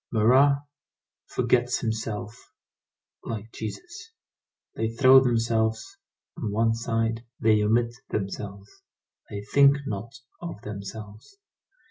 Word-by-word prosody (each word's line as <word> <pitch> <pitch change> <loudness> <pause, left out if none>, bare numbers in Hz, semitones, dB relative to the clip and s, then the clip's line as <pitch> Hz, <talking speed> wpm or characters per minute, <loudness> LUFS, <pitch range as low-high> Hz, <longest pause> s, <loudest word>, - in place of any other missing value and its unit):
Marat 135 +6 +4 0.6
forgets 125 0 +1
himself 110 -1 -4 0.7
like 110 0 -6
Jesus. 345 - -8 0.6
They 110 0 -1
throw 130 +3 +7
themselves 115 -3 0 0.4
on 105 - -3
one 115 +2 +2
side, 115 0 -1 0.2
they 110 -1 +4
omit 115 +3 +2 0.2
themselves, 100 0 -5 0.5
they 100 0 -6
think 140 +6 +5
not 110 +4 -5 0.3
of 170 -11 -6
themselves. 105 - -9
115 Hz, 95 wpm, -26 LUFS, 105-120 Hz, 0.7 s, throw